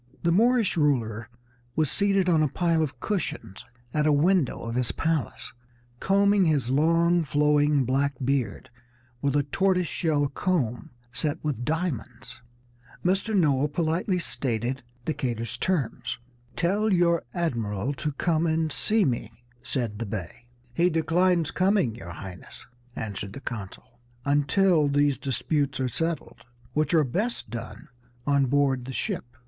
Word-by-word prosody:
The 170 - +3
Moorish 230 +1 +3
ruler 115 -8 0 0.5
was 155 -3 +1
seated 195 -2 +2
on 165 -3 +4
a 155 - +3
pile 165 +2 +1
of 135 -5 -3
cushions 120 - -3 0.3
at 150 0 +2
a - - +5
window 155 0 +2
of 115 0 -4
his 125 -1 +1
palace, 160 -8 -2 0.5
combing 200 0 +3
his 145 -6 +1
long, 165 +4 +3
flowing 150 -2 +2
black 140 +3 +1
beard 130 -6 -1 0.5
with 140 0 0
a 145 - +3
tortoise 180 +4 +1
shell 150 -5 0
comb 140 -4 -1 0.2
set 150 +2 -1
with 145 -6 -2
diamonds. 160 -3 -4 0.6
Mr. 195 +4 +1
Noah 145 -5 +3
politely 165 +5 0
stated 130 -6 -2 0.2
Decatur's 125 -6 -2
terms. 150 -9 -1 0.4
"Tell 205 +5 +1
your 170 -2 +3
admiral 120 - -2
to 150 +2 -3
come 165 +2 +1
and 160 -1 0
see 215 +7 +2
me," 120 -4 -2 0.3
said 115 -3 -2
the 115 - -3
Bey. 100 +3 -6 0.3
"He 170 +7 +3
declines 170 +1 +2
coming, 185 - +2
your 90 -6 -9
Highness," 90 +2 -10 0.3
answered 100 -2 -5
the - - -7
consul, 115 -1 -8 0.3
"until 150 +3 +3
these 145 -1 +2
disputes 140 +1 -1
are 130 - +1
settled, 165 +6 -3 0.3
which 150 0 +1
are 155 - +5
best 205 - -2
done 115 0 -7 0.4
on 140 -2 +3
board 135 -2 +1
the 130 - -6
ship." 170 - -3
150 Hz, 140 wpm, -26 LUFS, 125-170 Hz, 0.6 s, a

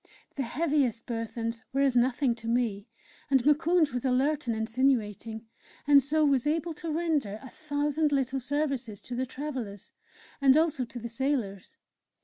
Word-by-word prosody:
The 280 - -2
heaviest 270 -3 0
burthens 230 -1 -4
were 275 - +1
as 270 -3 +3
nothing 245 +1 +2
to 230 -1 -10
me, 230 -3 0 0.4
and 265 -3 +4
Moukounj 310 +1 +3
was 245 - -2
alert 270 +2 +1
and 230 - 0
insinuating, 225 -2 0 0.4
and 285 -1 +7
so 305 +3 +2
was 275 -1 +2
able 325 +2 0
to 320 +1 -5
render 300 -10 0
a 260 - -10
thousand 295 0 -1
little 270 -1 0
services 265 -5 -2
to 245 - -7
the 255 +1 -1
travellers 255 -8 -6 0.5
and 275 +1 +6
also 310 -5 +1
to 235 +1 -10
the 235 0 -5
sailors. 235 -1 -3
265 Hz, 155 wpm, -28 LUFS, 235-295 Hz, 0.5 s, and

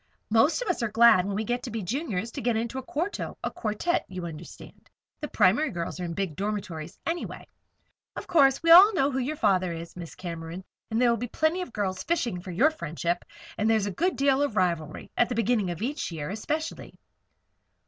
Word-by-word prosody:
"Most 250 - +3
of - - -9
us 360 -7 0
are 230 - +1
glad, 220 -4 +6
when 200 - -2
we 215 - -1
get 245 +2 -2
to 250 - -6
be 225 -2 -4
Juniors, 230 - -3
to 275 - -6
get 235 -1 +1
into 235 +3 -3
a - - -5
quarto 325 +9 -4
a - - -2
quartette, 220 +11 -1
you 185 -2 -6
understand. 165 0 -11 0.3
The 300 - -4
primary 230 +7 +3
girls 170 -4 -5
are - - -3
in 170 -1 -4
big 190 -5 -2
dormitories, 190 -5 -4
anyway. 335 +1 -4 0.7
Of - - -6
course, 275 -4 +4
we 330 - +4
all 385 +5 +9
know 280 -4 +2
who 265 - -1
your 270 +5 -2
father 185 - +2
is, 165 0 -7
Miss 170 -2 -8
Cameron, 170 0 -6 0.3
and 225 0 0
there 245 -1 +4
will 235 - +1
be 245 +3 -4
plenty 315 +8 0
of 360 - -4
the - - -19
girls 190 -3 -2
fishing 240 - -1
for 185 - -9
your 245 - +3
friendship. 175 - -3 0.4
And 215 +1 +2
there's 220 -2 +3
a 205 - -2
good 355 - 0
deal 275 0 +2
of 285 -7 0
rivalry 170 -4 -1
at 240 - +2
the 245 - -2
beginning 225 -4 +1
of 175 +4 -4
each 280 -4 -3
year, 155 0 -5
especially." 305 +10 -4
220 Hz, 220 wpm, -27 LUFS, 180-275 Hz, 0.7 s, all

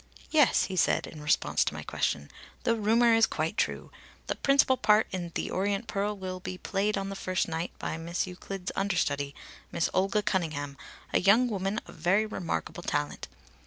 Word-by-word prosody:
"Yes," 295 -5 +5
he 190 - -3
said 175 - +2
in 155 - -10
response 150 0 +2
to - - -3
my - - -6
question, 70 0 -2 0.3
"The 230 - +2
rumour 230 +2 +4
is 225 0 +5
quite 160 +4 -2
true. - - -1 0.3
The - - -1
principal 275 -1 +4
part 215 -3 +4
in 175 -3 -4
'The - - -2
Orient 200 +3 0
Pearl' 205 -1 -2
will 185 -1 -5
be 185 0 -6
played 200 +3 -1
on 195 0 -2
the 195 - -5
first 185 -1 -1
night 165 +1 -2
by - - -3
Miss 170 +2 -2
Euclid's 180 0 -6
understudy, 145 -8 0 0.4
Miss 170 - 0
Olga 195 +3 +2
Cunningham, 155 -8 -1 0.4
a - - +5
young 220 +7 +5
woman 200 -1 -1
of - - -12
very 195 +5 +2
remarkable 180 -4 -4
talent. 145 -3 -2
195 Hz, 180 wpm, -29 LUFS, 170-210 Hz, 0.4 s, Yes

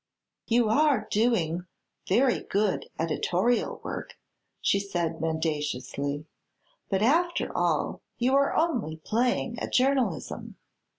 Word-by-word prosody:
"You 235 -1 +3
are 285 +1 +3
doing 180 -6 +1 0.4
very 245 +6 +3
good 205 0 0
editorial 180 +8 0
work," - - -6 0.4
she 200 - +2
said 170 -5 -2
mendaciously, 150 -3 -2 0.6
"but, 195 0 +1
after 345 +8 +2
all, - - 0 0.2
you 250 +2 +2
are 280 0 +3
only 245 - 0
playing 235 +5 0
at - - -4
journalism. 255 - 0
210 Hz, 105 wpm, -27 LUFS, 160-245 Hz, 0.6 s, You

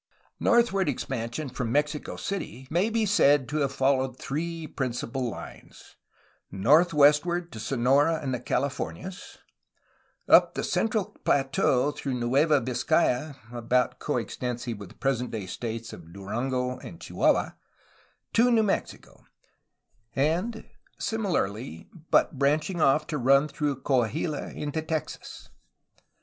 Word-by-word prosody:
Northward 215 -7 +3
expansion 125 +1 -3
from 125 -2 -3
Mexico 150 +2 -1
City 160 -9 -5
may 180 +7 +2
be 225 -1 +1
said 145 - +4
to 150 - -2
have 140 -3 +1
followed 135 -1 +1
three 165 +4 -4
principal 125 -2 -3
lines: - - -11 0.5
northwestward 150 - +4
to 110 - -8
Sonora 135 +7 +2
and 135 -4 -3
the 125 - -2
Calif 135 +3 -1
ornias; 190 0 -7 0.9
up - - +6
the - - -2
central 215 -2 0
plateau 135 0 +2
through 135 -2 -4
Nueva 140 +5 +3
Vizcaya 125 +3 +1 0.2
(about 120 +1 0
co - - -1
extensive 120 -3 -4
with 100 -3 -9
the - - -17
present 125 -2 -1
day 110 -4 -5
states 115 +4 -5
of 85 -1 -12
Durango 125 +7 -3
and 85 - -10
Chihuahua) - - +1 0.8
to 235 +2 +5
New 230 -2 +4
Mexico; 205 - -3 1.7
similarly, 125 - -2 0.2
but 135 - +3
branching 155 +5 +1
off 150 +2 +4
to 150 - -3
run 135 +4 +4
through 145 -3 -3
Coahuila 140 +4 0
into 150 +2 -3
Texas. 160 -1 -5
135 Hz, 120 wpm, -27 LUFS, 125-155 Hz, 1.7 s, up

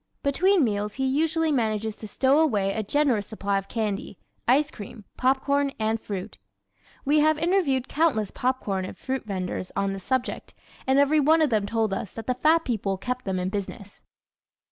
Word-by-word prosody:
Between 360 +5 +3
meals 210 -2 -1
he 265 - -1
usually 315 +4 +1
manages 220 -4 0
to 215 - -8
stow 270 +7 +3
away 205 -11 +2
a 220 - -1
generous 240 -2 +1
supply 200 -2 -1
of 195 - -10
candy, 205 -3 -3 0.3
ice 285 +5 +3
cream, 210 0 -10
popcorn 275 +2 +1
and 220 0 -1
fruit. 200 0 -6 0.7
We 295 +2 +4
have 310 +1 +4
interviewed 315 -6 +1
countless 285 -11 +1
popcorn 230 -7 -1
and 185 - -7
fruit 265 -3 -4
vendors 185 -2 -4
on 195 0 0
this 195 -1 -7
subject 260 +2 -2 0.3
and 265 +1 +3
every 285 +2 +4
one 315 +3 +4
of 295 - +1
them 210 -2 +1
told 220 -2 0
us 195 0 -4
that 225 - -7
the 255 - +1
fat 315 +6 +3
people 205 -6 -1
kept 250 +5 -4
them 190 -1 -1
in 180 0 -1
business. 200 0 -6
240 Hz, 180 wpm, -25 LUFS, 205-285 Hz, 0.7 s, We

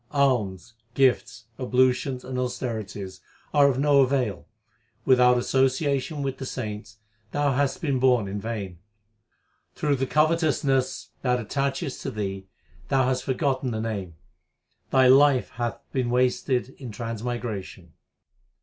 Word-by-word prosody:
Alms 120 -8 0 0.2
gifts, 125 -3 +1
ablutions, 125 0 +1
and 130 0 -4
austerities 105 -7 -4 0.3
are 145 -2 +6
of 130 - -1
no 140 0 +4
avail; 125 -8 0 0.6
without 125 -1 +5
association 135 +3 0
with 135 -1 -3
the 135 - -4
saints, 105 -3 -6 0.4
thou 145 -1 +2
hast 145 +7 0
been 140 -5 +1
born 125 -5 +3
in 100 +1 -4
vain. 100 -6 -5 1.0
Through 145 -2 0
the 135 +1 -1
covetousness 150 -4 +1
that 125 -1 +1
attacheth 135 +3 -2
to - - -3
thee 95 -2 -4 0.4
thou 135 -1 +2
hast 130 -1 -1
forgotten 130 -1 0
the 110 -2 -3
Name; 100 -7 -4 0.7
thy 130 -1 +4
life 135 0 +5
hath 120 0 -3
been 130 -3 -1
wasted 125 +1 +1
in 130 -3 -7
transmigration. 115 -6 -5
125 Hz, 125 wpm, -25 LUFS, 115-135 Hz, 1.0 s, are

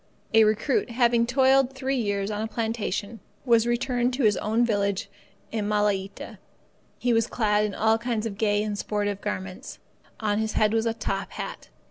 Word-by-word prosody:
A 220 0 +7
recruit, 220 +6 +1
after - - -8
having 235 -1 +3
toiled 265 +1 +3
three 265 0 -2
years 205 -4 -1
on 210 0 -3
a 220 - -2
plantation, 220 -1 -3 0.3
was 235 -2 +4
returned 245 +1 0
to 270 - -1
his 210 -2 +4
own 225 +3 +1
village 200 -3 -1 0.4
on 215 -2 -1
Malaita. 205 -2 -1 0.6
He 245 -1 +1
was 230 0 +2
clad 210 -2 +1
in 210 - -4
all 220 +1 +2
kinds 230 -2 -2
of 215 -3 -4
gay 210 -1 +2
and 210 -1 -2
sportive 205 -1 -2
garments. 190 -3 -5 0.4
On 210 -1 0
his 220 0 -1
head 215 0 +2
was 225 0 +1
a 225 - -1
top - - -3
hat. - - -7
220 Hz, 180 wpm, -26 LUFS, 205-235 Hz, 0.6 s, A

